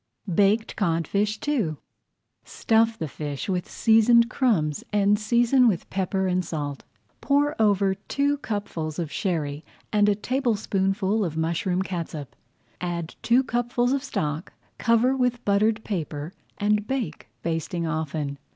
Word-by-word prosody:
BAKED 205 +5 +2
CODFISH 200 +3 0
II 225 - +1 0.7
Stuff 225 0 +1
the 160 - -3
fish 145 -1 -5
with 180 -3 -2
seasoned 235 +1 +4
crumbs 170 - +1
and 205 0 +3
season 240 +3 +4
with 185 -6 0
pepper 190 0 0
and 185 0 +1
salt. 145 -4 -4 0.4
Pour 290 +2 +2
over 200 -2 +3
two 280 +8 -1
cupfuls 175 - -4
of 165 -4 -3
Sherry 155 -5 -2 0.3
and 210 0 +4
a 205 - +3
tablespoonful 210 -4 0
of 160 -4 -3
mushroom 170 +3 0
catsup. 165 -6 -5 0.5
Add 170 -2 -3
two 245 +3 +4
cupfuls 245 +1 0
of 275 -1 -1
stock, 155 - -3 0.3
cover 230 +3 +3
with 245 -2 0
buttered 215 +2 +2
paper, 160 -4 -4 0.2
and 210 0 +1
bake, 245 - -3 0.2
basting 165 +1 -2
often. 155 -3 -3
200 Hz, 130 wpm, -25 LUFS, 165-230 Hz, 0.7 s, seasoned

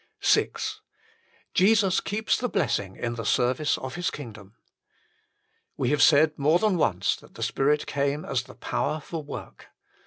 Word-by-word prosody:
VI - - +4 1.0
Jesus 195 -1 +4
keeps 215 +2 -1
the 245 - -2
blessing 105 - -1
in 120 -1 -3
the 115 -1 -5
service 125 +7 +1
of 130 0 -6
His 175 +1 -1
kingdom. 110 -7 -10 1.2
We 125 - 0
have 150 -1 +2
said 155 +1 +5
more 150 +4 +4
than 205 -1 +1
once 95 - +1
that - - -19
the - - -5
Spirit 145 +2 +1
came 140 +1 -1
as 130 -2 -1
the - - -14
power 155 +5 -2
for 160 +2 -6
work. 145 -1 -9
145 Hz, 155 wpm, -26 LUFS, 125-170 Hz, 1.2 s, said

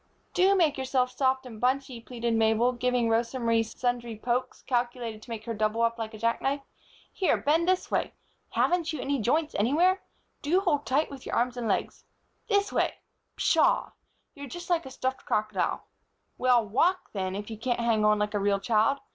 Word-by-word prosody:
"Do 385 +2 +4
make 315 -7 +2
yourself 260 -1 0
soft 260 0 +1
and 225 -4 -10
bunchy," 255 -1 0
pleaded 235 -1 -3
Mabel, 225 +2 +3
giving 250 -1 0
Rosa 230 +3 +1
Marie 230 -2 +2
sundry 240 0 -3
pokes, 250 +3 -2
calculated 240 -3 -2
to - - -15
make 220 -2 -6
her 230 - -3
double 215 +1 0
up 230 0 +1
like 220 0 -5
a - - -8
jack 230 +2 0
knife. 280 +1 0 0.5
"Here, 375 - +2
bend 325 +4 +1
this 370 0 +1
way. - - 0 0.4
Haven't 340 -2 +1
you 310 - -5
any 275 -1 -1
joints 305 +8 +1
anywhere? 330 - +2 0.4
Do 330 +6 +2
hold 295 -7 0
tight 285 +4 +1
with 275 -2 -9
your - - -2
arms 245 +1 +1
and 240 -2 -3
legs. 200 - -1 0.4
This 405 -2 +1
way. - - +1 0.4
Pshaw! - - +2 0.4
You're 285 -2 -8
just 350 +5 -7
like 335 -4 +1
a - - -7
stuffed 260 0 -3
crocodile. 215 -3 -1 0.5
Well, 245 -3 +3
walk 355 - +1
then, 190 -2 -2
if 205 +2 -6
you 220 - -6
can't 240 +1 -1
hang 230 -2 +2
on 210 0 +4
like 210 0 -1
a 205 - +1
real 200 0 +1
child. 225 +6 +2
245 Hz, 190 wpm, -28 LUFS, 225-280 Hz, 0.5 s, Do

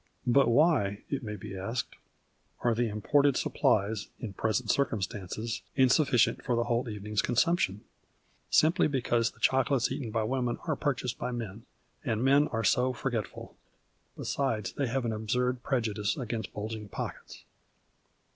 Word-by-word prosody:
But 135 +3 +4
why, 120 - +3
it 140 -1 -1
may 105 -3 -5
be 95 0 -8
asked, 105 +6 -3 0.7
are 120 -1 +2
the 120 +1 +1
imported 140 +7 +2
supplies, 105 +2 +1
in 110 -5 -6
present 110 +3 0
circumstances, 110 -3 -2
insufficient 130 -1 +3
for 125 - 0
the 120 - +2
whole 120 0 -1
evening's 105 0 -2
consumption? 120 - +1 0.7
Simply 165 +4 +4
because 120 -5 +1
the - - -21
choco 135 +1 +3
lates 125 -1 +1
eaten 130 -4 -3
by 110 0 0
women 125 0 -1
are 155 - +1
purchased 125 -4 -2
by - - -2
men, 115 -1 -6 0.4
and 115 -3 -1
men 140 +3 +5
arc 115 -1 -2
so 125 +3 +3
forgetful. 120 -5 -4 0.6
Besides 110 -9 -1
they 140 - -1
have 125 +1 -1
an 115 - 0
absurd 125 +3 -1
prejudice 110 -2 -1
against 115 -4 -4
bulging 110 0 -5
pockets. - - -7
120 Hz, 145 wpm, -29 LUFS, 110-130 Hz, 0.7 s, men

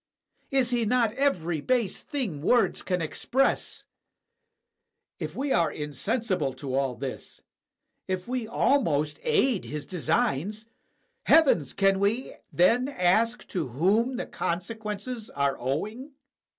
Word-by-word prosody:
Is 265 -3 +1
he 240 -1 +1
not 230 0 +2
every 175 - 0
base 240 - 0
thing 235 - -4
words 240 +9 +2
can 180 -3 -1
ex 155 - -4
press? 270 +2 0 1.4
If - - -5
we 280 +1 -2
are 170 -7 +3
insensible 150 - -2
to 130 0 -6
all 135 -2 0
this, - - -7 0.6
if 185 +1 -3
we 250 -2 -2
almost 160 - +1
aid 270 - +2
his 150 -1 -5
designs 180 +4 -1 0.3
— - - -46
heavens! 265 - +5
can 195 -1 +3
we 215 +6 0 0.2
then 235 +9 +3
ask 230 0 +1
to 170 -8 -2
whom 205 - +1
the - - -3
con 170 +1 -2
sequences 220 +2 -6
are 140 -1 0
owing? 215 - -3
205 Hz, 130 wpm, -27 LUFS, 160-245 Hz, 1.4 s, heavens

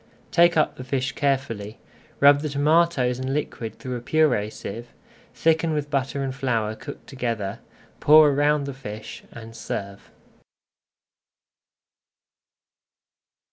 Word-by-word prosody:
Take 170 0 +4
up 155 - +1
the 130 - -7
fish 130 0 -2
carefully, 125 -7 -2 0.4
rub 145 0 +6
the 150 - -3
tomatoes 145 -3 +2
and 130 +1 -2
liquid 115 -7 -4
through 130 -2 -5
a - - -8
purée 125 -7 +1
sieve, 115 +4 -8 0.4
thicken 160 0 +2
with 145 -1 -3
butter 140 0 -1
and 135 -1 -3
flour 115 -6 -1
cooked 145 +5 -10
together, 115 -5 -4 0.4
pour 150 0 +7
around 145 +1 +2
the 140 0 -5
fish, 110 -5 -9
and 115 -1 -11
serve. 100 -3 -6
135 Hz, 120 wpm, -24 LUFS, 115-145 Hz, 0.4 s, pour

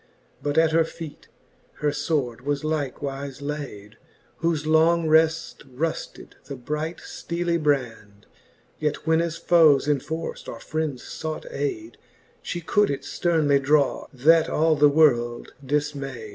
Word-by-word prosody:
But 145 +1 -2
at 160 0 +4
her 165 +1 +4
feet 160 -1 -9 0.5
her 150 - -1
fword 145 -5 -2
was 145 +2 -2
likewife 140 -2 -3
layd,. 140 -8 -6 0.4
Whofe 165 -3 0
long 160 +1 +3
reft 160 +1 +2
rufted 155 +6 -4
the 140 - -6
bright 150 +6 -4
fteely 170 -1 -3
brand; 115 -8 -2 0.5
Yet 150 -1 -2
when 160 0 +3
as 170 -1 -3
foes 155 -5 +4
enforft, 155 +3 -3
or - - -7
friends 155 -5 -3 0.2
fought 160 -1 -4
ayde, 365 -8 -4 0.4
She 175 - -4
could 205 +5 +2
it 140 - -3
fternely 155 -5 +1
draw, 145 0 +2
that 155 +5 +4
all 160 0 +2
the 145 0 +5
world 120 -6 +2
difmayde. 135 -5 -3
150 Hz, 130 wpm, -24 LUFS, 140-160 Hz, 0.5 s, the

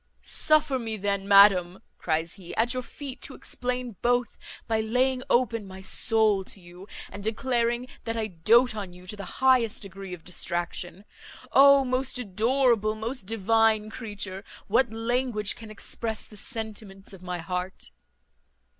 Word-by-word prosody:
"Suffer 305 -4 +3
me 225 -2 -4
then, 200 -1 -2
madam," 195 -3 +6 0.2
cries 160 0 -1
he, 180 -4 -10
"at 235 +3 +1
your 255 - -2
feet 270 +1 -9
to - - -6
explain 250 -3 -4
both, 245 0 +1 0.3
by 220 -1 +1
laying 255 +3 +1
open 230 -3 +2
my 190 0 -10
soul 215 0 +2
to 195 - -7
you, 175 +2 -13 0.2
and 200 - -8
declaring 235 +1 0 0.2
that 230 0 -2
I 220 - 0
doat 220 +6 +3
on 195 -4 -6
you 180 0 -14
to 200 - -5
the 200 -1 -7 0.2
highest 250 -6 +4
degree 195 -1 -7
of 165 - -19
distraction. 175 +2 -3 0.5
O 280 0 +7
most 255 +1 -1
adorable, 225 0 +1
most 220 -1 -5
divine 220 0 +2
creature! 205 -4 -6 0.2
what 235 +3 +2
language 225 -2 -1
can 225 -2 -11
express 220 +1 -4
the 215 - -14
sentiments 205 -2 -4
of 190 - -12
my 180 -1 -4
heart?" 180 +2 -5
220 Hz, 150 wpm, -26 LUFS, 195-245 Hz, 0.5 s, O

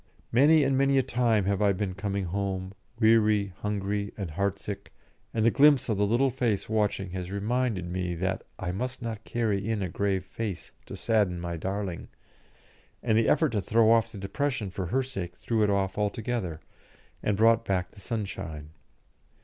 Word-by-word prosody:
Many 145 +5 +6
and 135 0 +2
many 135 +1 +3
a 135 - +4
time 120 -5 +1
have 100 0 0
I 100 -1 +4
been 95 0 -2
coming 100 0 -2
home, 95 +1 -3 0.3
weary, 110 -3 +4
hungry, 100 0 -2
and 95 -6 -4
heart 100 +4 -1
sick, 100 -1 -7 0.4
and 110 -1 0
the 115 - +5
glimpse 145 -2 +5
of 110 - +1
the 105 - +3
little 125 +5 +3
face 120 -5 0
watching 105 -3 0
has 90 -1 -5
reminded 105 0 -1
me 90 0 -2
that 95 +2 -2
I 90 -2 -3
must 125 +6 -4
not 110 -2 -4
carry 110 -3 -1
in 110 -3 0
a 90 - -2
grave 95 0 -1
face 100 -1 -5 0.2
to - - -7
sadden 105 -6 +1
my 85 0 -4
darling, 95 +1 -4 1.0
and 110 - +2
the 110 0 +3
effort 160 - +3
to 105 -4 -1
throw 110 +2 +4
off 115 0 +3
the - - -9
depression 120 0 -2
for 95 -1 -4
her 130 +9 +1
sake 95 -9 -6
threw 115 -2 -1
it 105 - +3
off 100 0 0
altogether, 105 -5 -2 0.6
and 105 -2 0
brought 115 +1 +5
back 90 -3 -1
the 105 - -16
sunshine. 95 -9 -5
105 Hz, 180 wpm, -28 LUFS, 95-115 Hz, 1.0 s, Many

